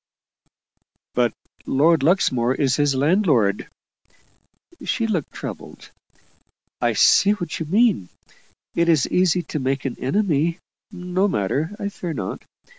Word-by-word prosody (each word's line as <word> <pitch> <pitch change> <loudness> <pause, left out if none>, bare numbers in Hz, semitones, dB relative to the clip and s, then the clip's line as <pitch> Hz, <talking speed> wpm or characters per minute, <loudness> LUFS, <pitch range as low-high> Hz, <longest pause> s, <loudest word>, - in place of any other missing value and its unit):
"But 120 -2 +2 0.4
Lord 155 +3 +3
Luxmore 130 -7 +2
is 135 -3 +1
his 145 -2 +2
landlord." 140 - +2 1.1
She 230 - -1
looked 185 -10 -2
troubled. - - -9 0.9
"I - - +2
see 200 +1 +5
what 175 -7 -5
you 160 - -4
mean. 200 - +2 0.6
It 170 0 +1
is 155 -5 +3
easy 180 -1 +2
to 150 - -5
make 135 0 -2
an 130 - -4
enemy. 165 +1 0 0.3
No 185 0 -1
matter 155 - -1
I 205 -3 -3
fear 175 -4 -6
not. 95 -9 -5
160 Hz, 120 wpm, -22 LUFS, 135-185 Hz, 1.1 s, see